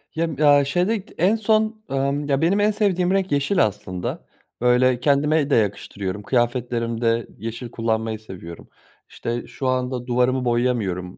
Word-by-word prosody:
Yem 160 -2 -1
ya, 145 -2 +5
şeyde 185 +7 0
k - - -18
en 190 +7 +3
son, 220 0 +1
amm, 140 +2 -1
ya, 135 0 +1
benim 185 +5 +2
en 210 +1 +3
sevdiğim 185 -4 +1
renk 195 -2 0
yeşil 140 - +2
aslında. 90 -3 -5 0.4
Böyle, 125 0 +3
kendime 150 +1 +2
de - - +3
yakıştırıyorum. 100 -2 -2
Kıyafetlerimde 120 -1 0
yeşil 115 +2 -6
kullanmayı 110 -1 -1
seviyorum. 90 -5 -10 0.4
İşte, 120 +1 -4
şu 130 - -4
anda 130 -1 -1
duvarımı 125 +1 +1
boyayamıyorum 110 -7 -1
130 Hz, 145 wpm, -22 LUFS, 115-160 Hz, 0.4 s, ya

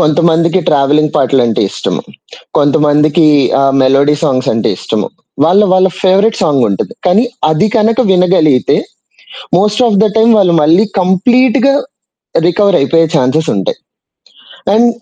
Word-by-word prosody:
కొంతమందికి 165 +3 +1
ట్రావెలింగ్ 150 +1 +1
పాటలంటే 125 -4 0
ఇష్టం. - - -4 0.6
కొంతమందికి 150 +2 +2 0.3
ఆహ్, 135 0 +1
మెలోడీ 140 +3 +2
సాంగ్స్ 130 -4 -1
అంటే 115 0 -1
ఇష్టము. - - -4 0.4
వాళ్ళ 180 +5 +3
వాళ్ళ 185 0 +3
ఫేవరెట్ 200 +4 +1
సాంగ్ 140 -4 +1
ఉంటది. 100 - -4
కానీ 190 +6 +2 0.3
అది 155 +7 +1
కనక 225 +3 +1
వినగలిగితే 180 -8 +1 0.8
మోస్ట్ 210 +4 0
ఆఫ్ 205 -4 +1
ద - - +3
టైమ్ 225 +1 +3
వాళ్ళు 180 -4 +2
మళ్ళీ 170 +8 +3 0.2
కంప్లీట్‌గా 245 +8 +1 0.7
రికవర్ 200 +1 +1
అయిపోయే 165 +4 +1
చాన్సెస్ 155 +4 0
ఉంటాయి. 95 - -3 1.0
అండ్ 230 +3 +3
165 Hz, 125 wpm, -11 LUFS, 145-200 Hz, 1.0 s, వాళ్ళ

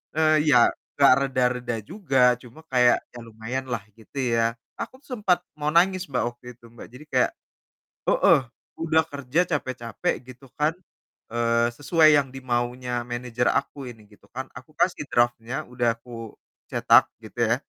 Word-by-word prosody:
Eee, 155 -1 +3
ya, 125 -5 +6 0.2
enggak 140 -1 +6 0.2
reda-reda 125 -2 0
juga, 140 - -2 0.2
cuma 125 +6 -15
kayak, 125 -1 +4
ya 120 - -10
lumayanlah, 115 +1 -5 0.2
gitu 125 +5 -15 0.2
ya. 115 0 +1 0.2
Aku - - -5
tuh - - -23
sempat 180 -4 +2 0.2
mau 150 +1 0
nangis 185 +1 +3
Mbak, 130 -3 -1
waktu 120 +1 -25
itu, 120 - -21
Mbak. 120 - -11
Jadi 130 +4 -12
kayak - - +2 0.8
heeh, - - +5 0.4
udah 160 0 +3
kerja 140 0 -3
capek-capek 130 -7 -2
gitu 130 +1 -13
kan, 150 +2 +2 0.6
eee, 115 0 +1
sesuai 155 +2 +4
yang 140 - +1
dimaunya 125 -1 -2
manajer 120 0 -3
aku 140 -2 -2
ini 110 -3 -14
gitu 105 -1 -21
kan, 130 +2 -4
aku 130 +4 -13
kasih 180 -5 +1
drafnya, 120 +1 0
udah 120 -2 +1
aku 115 -3 -9 0.4
cetak - - +5 0.2
gitu - - -11
ya, - - +4
125 Hz, 155 wpm, -25 LUFS, 120-145 Hz, 0.8 s, ya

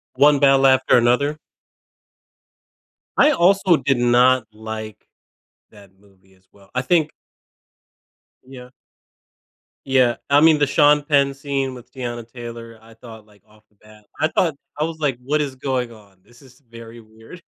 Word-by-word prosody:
One 145 +1 +4
Battle 135 -1 +4
After 130 -1 +4
Another? 125 +5 +1 1.8
I 300 - +5
also 190 - +3
did 135 -2 -1
not 120 0 +3
like 110 -1 -9 0.6
that 100 -3 -18
movie, 95 -1 -27
as 95 0 -31
well. 100 -1 -23
I 125 - -1
think 155 +2 0 1.3
Yeah. 125 -1 -13 1.2
Yeah. 130 -3 +2
I 145 +1 +4
mean, 160 -2 +5
the 145 - +2
Sean 145 +1 +3
Penn 140 -2 +1
scene 135 -1 -4
with 125 0 -14
Teyana 120 -3 -7
Taylor, 115 -2 -10
I 115 0 -18
thought, 110 -2 -14
like, 105 -3 -25
off 110 0 -25
the 105 - -37
bat. 105 0 -21
I 155 - +2
thought 160 -2 -1 0.2
I - - +1
was 160 0 -5
like, 140 -5 -1
"What 150 +3 -1
is 135 -3 -5
going 130 -3 -3
on? 100 -4 -19
This 120 +3 -22
is 130 0 -20
very 115 0 -12
weird." 110 +10 -16
125 Hz, 155 wpm, -20 LUFS, 110-140 Hz, 1.8 s, I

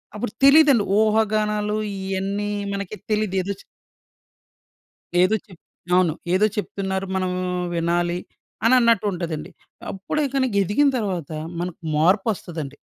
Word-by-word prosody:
అప్పుడు 210 +1 -3
తెలీదండి. 275 -5 +7 0.2
ఊహాగానాలు 215 -1 +1 0.2
ఇయన్నీ 195 +2 -2 0.2
మనకి 200 +1 -4
తెలీదు. 215 -2 0
ఏదొచ్ 195 +1 -5 1.6
ఏదో 185 +4 +4
చెప్ 185 -5 -16 0.3
అవును. 180 -4 +3 0.2
ఏదో 195 +3 +4
చెప్తున్నారు. 190 -2 -2
మనం 185 -1 0 0.4
వినాలి 175 +1 0 0.5
అనన్నట్టు 235 -4 +4
ఉంటదండి. 170 -4 -4 0.4
అప్పుడే 195 +10 -3
ఇక 270 - -8
నీకెదిగిన 210 +4 +2
తర్వాత 185 - -3 0.3
మనకు 175 -1 -4 0.2
మార్పొస్తదండి. 170 - 0
200 Hz, 100 wpm, -23 LUFS, 180-215 Hz, 1.6 s, తెలీదండి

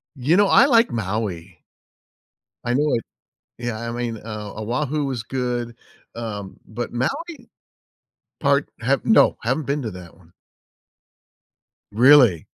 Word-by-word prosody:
You 140 +6 +1
know, 205 0 +4
I - - +7
like 235 -4 +4
Maui. 95 -6 -4 1.0
I 120 0 -1
know 150 +3 +1
it 115 - -2 0.5
Yeah, 120 -2 -4
I 115 0 -4
mean, 120 -1 -3
uh, 105 -2 -7
Oahu 140 +7 -2
was 125 -5 -3
good, 120 -1 -3 0.4
um, 105 -4 -6
but 120 +2 -6
Maui 255 - -4 0.9
Part - - +1
have - - 0
No, - - +5
haven’t 155 - -1
been 145 +1 -1
to 110 - -4
that 90 -2 -11
one. 85 -2 -23 1.6
Really? 120 - +5
120 Hz, 130 wpm, -22 LUFS, 105-140 Hz, 1.6 s, I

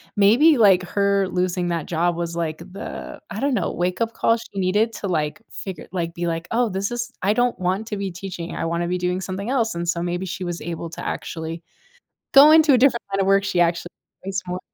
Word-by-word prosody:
maybe, 240 +10 +5
like, 195 -5 +6
her 200 +1 +1
losing 180 -1 -1
that 170 -3 -2
job 175 +1 +1
was, 170 0 -3
like, 160 -2 -2
the, 185 +3 -8
I - - -5
don't 280 0 +1
know, - - -1
wake 180 +2 -2
up 230 0 0
call 230 - +2
she 205 -3 -8
needed 205 +5 +1
to, 200 - -4
like, 155 +1 -1
figure 190 -5 -7
like, 170 -2 -3
be 175 - -3
like, 165 0 -3
"Oh, 235 0 +2
this 195 +1 -2
is 240 +1 -3
I 200 +3 +2
don't 245 -2 +1
want 185 +4 -1
to 210 - -4
be 195 -1 -3
teaching, 175 -1 -6
I - - -2
wanna 170 +1 -1
be 180 +1 -1
doing 180 +1 -1
something 190 +3 -4
else," 230 -7 +1
and 170 0 -3
so 170 -1 0
maybe 175 +1 -2
she 185 +1 -5
was 175 -1 -4
able 170 0 -5
to - - -7
actually 165 0 -5 0.7
go 280 +2 +10
into 315 -3 +6
a - - +5
different 245 -1 +3
kind 195 0 0
of 190 - -1
work 195 0 +4
she 185 - -1
actually 170 0 +1 0.4
likes 195 0 -2
more. 180 +1 -4
185 Hz, 230 wpm, -22 LUFS, 175-210 Hz, 0.7 s, go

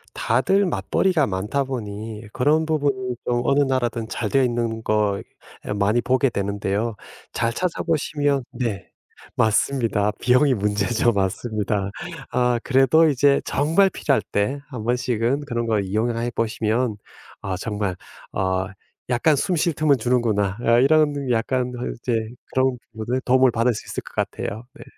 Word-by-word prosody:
다들 190 - +2
맞벌이가 155 - +1
많다 105 +9 -1
보니 110 -3 -6
그런 150 +5 +2
부분이 140 -5 -1
좀 120 0 +1
어느 140 +2 +3
나라든 120 -4 -1
잘 110 -1 -3
되어 135 - +3
있는 115 -2 -1
거 105 -2 +1 0.5
많이 105 +4 +2
보게 130 +2 +2
되는데요. 100 +1 -2 0.4
잘 115 0 -1
찾아보시면 150 -4 0
네. 115 -7 -3 0.5
맞습니다. 110 -2 +1
비용이 125 +3 +4
문제죠. 105 +3 +1
맞습니다. 100 0 -1 0.4
아, 125 -1 +2
그래도 135 +5 +4
이제 140 0 +3
정말 165 +7 +3
필요할 135 -8 +1
때 105 +8 0
1 125 -6 -6
번씩은 125 +2 0
그런 120 -4 -2
걸 110 -3 +1
이용해 115 +4 -1
보시면 115 +1 0 0.5
아, 95 -1 -3
정말 105 -1 -2 0.4
어 95 0 0 0.4
약간 130 +5 +3
'숨 180 +6 0
쉴 170 +1 +1
틈은 150 -2 +3
주는구나.' 110 -5 +1
어 115 0 +4
이런 145 0 +3
약간 125 +2 0 0.3
이제 120 -1 -1 0.4
그런 130 -1 +1 0.2
뭐지 115 +3 -2
도움을 130 0 +4
받을 120 +2 +2
수 - - -7
있을 - - -4
것 - - -14
같아요. 110 +3 -3
네. - - -12
120 Hz, 285 characters per minute, -22 LUFS, 105-135 Hz, 0.5 s, 비용이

